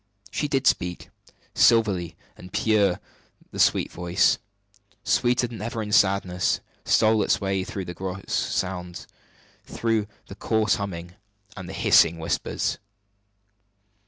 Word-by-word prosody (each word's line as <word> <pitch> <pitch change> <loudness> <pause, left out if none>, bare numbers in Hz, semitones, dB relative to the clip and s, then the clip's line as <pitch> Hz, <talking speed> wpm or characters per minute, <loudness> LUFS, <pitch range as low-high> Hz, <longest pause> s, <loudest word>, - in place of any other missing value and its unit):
She 150 - -1
did 135 -2 -1
speak. 90 -7 0 0.4
Silvery 100 -8 +3 0.2
and 90 - -13
pure 100 -5 +2 0.5
the - - -8
sweet - - +3
voice, 90 +2 +1 0.6
sweeter 125 0 +2
than 115 -4 -8
ever 115 0 -3
in 105 - -6
sadness, 95 -3 +2 0.3
stole 110 0 +3
its 110 - +1
way 95 -2 -1
through 95 0 -6
the 90 - -6
gross 95 +1 -6
sounds 90 -2 -2 0.6
through 115 -2 -1 0.2
the - - -10
coarse 110 +2 +1
humming 90 -4 -6 0.4
and 95 -3 -8
the - - -7
hissing 95 -6 +4
whispers. 80 0 -2
100 Hz, 125 wpm, -24 LUFS, 90-110 Hz, 0.6 s, hissing